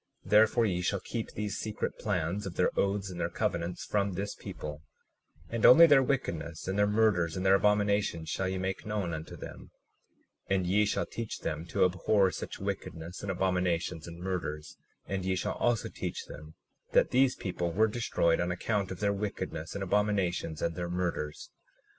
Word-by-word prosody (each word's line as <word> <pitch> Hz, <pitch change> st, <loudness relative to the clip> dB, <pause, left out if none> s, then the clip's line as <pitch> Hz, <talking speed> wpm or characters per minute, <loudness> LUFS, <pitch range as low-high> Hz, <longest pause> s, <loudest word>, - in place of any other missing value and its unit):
37:29 -, -, -11 dB
Therefore 110 Hz, +2 st, +5 dB
ye 90 Hz, -4 st, 0 dB
shall 95 Hz, +2 st, 0 dB
keep 115 Hz, +4 st, -4 dB
these 105 Hz, -1 st, -3 dB
secret 110 Hz, -1 st, -3 dB
plans 95 Hz, 0 st, -1 dB
of 90 Hz, -, -7 dB
their -, -, +2 dB
oaths 100 Hz, -1 st, 0 dB
and 90 Hz, -, -7 dB
their -, -, 0 dB
covenants 85 Hz, +1 st, -2 dB
from 100 Hz, -1 st, 0 dB
this 100 Hz, +3 st, -3 dB
people, 75 Hz, 0 st, -7 dB, 0.7 s
and 115 Hz, +2 st, -3 dB
only 165 Hz, +7 st, +10 dB
their 145 Hz, -4 st, +6 dB
wickedness 85 Hz, -, -2 dB
and 95 Hz, -, -1 dB
their 105 Hz, -, +4 dB
murders 105 Hz, -6 st, +2 dB
and 95 Hz, -, -2 dB
their 95 Hz, -, +6 dB
abominations 100 Hz, -4 st, +2 dB
shall 95 Hz, +4 st, -1 dB
ye 95 Hz, -, -2 dB
make 95 Hz, 0 st, -3 dB
known 105 Hz, -5 st, -2 dB
unto 80 Hz, 0 st, -6 dB
them; -, -, -10 dB, 0.8 s
and 95 Hz, -1 st, +2 dB
ye 100 Hz, +4 st, +3 dB
shall 105 Hz, -, 0 dB
teach 115 Hz, -2 st, -6 dB
them 80 Hz, +3 st, -3 dB
to -, -, +3 dB
abhor 95 Hz, +2 st, +2 dB
such -, -, -6 dB
wickedness 85 Hz, +3 st, -5 dB
and 100 Hz, -, -5 dB
abominations 90 Hz, -3 st, 0 dB
and 85 Hz, 0 st, -9 dB
murders; 80 Hz, -5 st, -4 dB, 0.3 s
and 95 Hz, -1 st, -3 dB
ye 95 Hz, 0 st, 0 dB
shall 90 Hz, -, -1 dB
also 120 Hz, -3 st, +1 dB
teach -, -, -5 dB
them 75 Hz, +1 st, -11 dB, 0.4 s
that -, -, +4 dB
these 130 Hz, 0 st, +4 dB
people 90 Hz, -2 st, -3 dB
were 110 Hz, +6 st, +3 dB
destroyed 105 Hz, -7 st, +1 dB
on 90 Hz, 0 st, 0 dB
account 100 Hz, +2 st, -1 dB
of 95 Hz, -, -7 dB
their 100 Hz, -1 st, +2 dB
wickedness 100 Hz, -5 st, -4 dB
and 100 Hz, -, -2 dB
abominations 95 Hz, -5 st, 0 dB
and 85 Hz, -1 st, 0 dB
their 85 Hz, 0 st, -3 dB
murders. 85 Hz, -4 st, -3 dB
95 Hz, 185 wpm, -30 LUFS, 85-105 Hz, 0.8 s, only